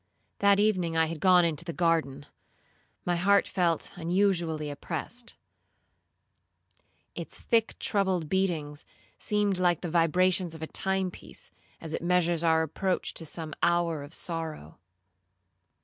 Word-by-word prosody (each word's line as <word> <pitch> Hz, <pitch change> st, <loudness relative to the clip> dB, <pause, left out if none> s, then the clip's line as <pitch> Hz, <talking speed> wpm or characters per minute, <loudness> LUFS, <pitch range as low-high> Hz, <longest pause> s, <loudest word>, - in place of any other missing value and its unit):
'That 200 Hz, 0 st, +4 dB
evening 185 Hz, -6 st, +1 dB
I 160 Hz, -, +4 dB
had 160 Hz, 0 st, -5 dB
gone 180 Hz, 0 st, +5 dB
into 165 Hz, -1 st, 0 dB
the 170 Hz, -, -4 dB
garden; 160 Hz, -5 st, 0 dB, 0.8 s
my 175 Hz, -, +1 dB
heart 200 Hz, +3 st, +3 dB
felt 170 Hz, -4 st, 0 dB
unusually 170 Hz, -4 st, 0 dB
oppressed. 235 Hz, +11 st, -4 dB, 1.8 s
Its -, -, -7 dB
thick 225 Hz, -1 st, 0 dB
troubled 190 Hz, -5 st, 0 dB
beatings, 160 Hz, -5 st, -1 dB, 0.4 s
seemed 205 Hz, -3 st, 0 dB
like 175 Hz, -2 st, +2 dB
the 175 Hz, -, -4 dB
vibrations 180 Hz, +1 st, +2 dB
of 160 Hz, -, -8 dB
a -, -, -1 dB
time 190 Hz, +2 st, -1 dB
piece, -, -, -11 dB, 0.3 s
as 160 Hz, -1 st, -6 dB
it -, -, -2 dB
measures 175 Hz, -1 st, +1 dB
our 160 Hz, -1 st, +3 dB
approach 180 Hz, +4 st, -2 dB
to 165 Hz, -, -5 dB
some 155 Hz, 0 st, -6 dB
hour 170 Hz, -3 st, +1 dB
of 145 Hz, +4 st, -10 dB
sorrow. 160 Hz, -, -5 dB
170 Hz, 135 wpm, -28 LUFS, 160-185 Hz, 1.8 s, gone